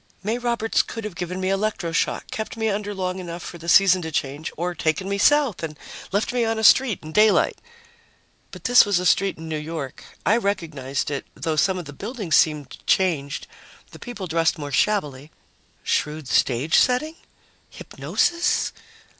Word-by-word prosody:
May 220 +4 -1
Roberts 235 -2 +1
could 225 - -7
have 210 -3 -5
given 180 +1 -5
me 185 0 -1
electro 195 -3 -1
shock, 165 - -1
kept 220 +1 -5
me 220 -1 0
under 205 0 -2
long 185 0 -3
enough 175 -1 -7
for 170 - -8
the 170 +1 -5
season 185 0 +6
to 160 -1 -5
change, 145 +1 -3
or 175 +2 -2
taken 165 +3 -1
me 200 0 -2
South 285 -3 +3
and 155 -2 -5 0.3
left 205 +5 0
me 245 -1 +1
on 225 0 0
a 220 - -2
street 230 -5 +5
in 155 - -8
daylight. 210 +3 +3 0.9
But - - -12
this 245 0 +7
was 205 -3 +1
a 180 - -2
street 195 +2 +2
in 160 0 -8
New 155 -1 -3
York. 150 -3 -6 0.2
I 225 - +4
recognized 160 - -2
it, 140 - -4
though 160 -1 -2
some 185 +5 +2
of 175 - -6
the 145 - -9
buildings 205 - -2
seemed 150 0 +1
changed, 155 -7 +1 0.5
the - - -12
people 235 -6 -7
dressed 165 0 +1
more 145 -2 -6
shabbily. 145 -5 0 0.5
Shrewd 150 -1 -1
stagesetting? 250 - +2 0.5
Hypnosis? 345 0 -1
185 Hz, 175 wpm, -23 LUFS, 155-215 Hz, 0.9 s, this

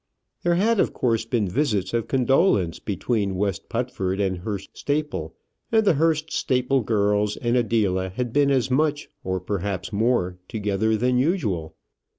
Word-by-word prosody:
There 175 0 +2
had 215 +4 +2
of - - +2
course 115 -2 0
been 115 -3 0
visits 105 -4 0
of 115 -1 0
condolence 130 - +2
between 100 -1 -1
West 100 0 -2
Putford 115 -6 -2
and 95 -3 0
Hurst 100 +1 -6
Staple, 145 - -2 0.4
and 220 -1 +3
the 195 - +5
Hurst 160 +1 +1
Staple 130 +1 +1
girls 105 -1 +1
and 120 +1 0
Adela 105 -6 +1
had 120 +5 -4
been 145 -1 +4
as 130 -2 +1
much, 150 +2 +1
or 95 0 -1
perhaps 95 0 -3
more, 100 -5 +1
together 110 0 0
than 125 +2 +2
usual. 115 - -1
115 Hz, 155 wpm, -24 LUFS, 100-135 Hz, 0.4 s, the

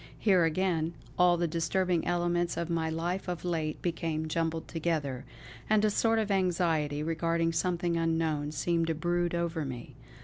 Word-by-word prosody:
Here 185 -6 +4
again, 165 -1 0 0.2
all 180 -1 +4
the 170 0 +1
disturbing 170 +2 0
elements 175 0 0
of 170 0 -2
my 165 -1 0
life 175 +4 -2
of 180 0 -4
late 160 -3 -2
became 165 -2 -2
jumbled 160 0 -1
together; 155 -6 -2 0.4
and 215 0 +4
a 210 - +3
sort 225 +2 +2
of 215 -2 0
anxiety 165 -6 +1
regarding 165 +1 0
something 175 0 0
unknown 160 -3 0
seemed 165 +1 0
to 165 - 0
brood 175 +1 0
over 170 -2 -1
me. 130 -1 -7
170 Hz, 160 wpm, -30 LUFS, 160-175 Hz, 0.4 s, Here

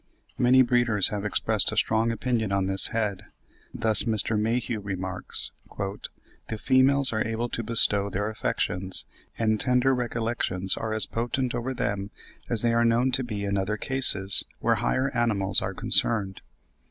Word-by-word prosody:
Many 130 +1 +4
breeders 120 -5 +3
have 105 -1 -5
expressed 105 -3 +1
a - - -7
strong 115 +1 0
opinion 115 -3 -3
on 100 -1 -1
this 95 0 +4
head. 105 -3 -4 0.4
Thus, 110 -4 +4
Mr. 110 0 -1
Mayhew 115 +1 -2
remarks, 95 -2 -4 0.3
"The 100 +2 -9
females 130 +2 +3
are 110 - -2
able 115 +1 -3
to 115 - -4
bestow 105 -3 +2
their 100 +2 -4
affections; 95 -3 -3 0.3
and 110 -1 -1
tender 125 +2 +1
recollections 115 -6 -3
are 110 - -5
as 110 0 +8
potent 120 +2 -4
over 125 +2 -5
them 100 -3 -4 0.4
as 115 -2 -1
they 115 -1 +1
are 115 0 +1
known 120 +3 +1
to 130 +1 0
be 105 -4 -6
in 100 0 -2
other 105 +3 -3
cases, 100 -7 +4 0.2
where - - 0
higher 130 +1 -2
animals 105 -5 +3
are - - -5
concerned. 100 -4 +1
110 Hz, 155 wpm, -24 LUFS, 100-120 Hz, 0.4 s, as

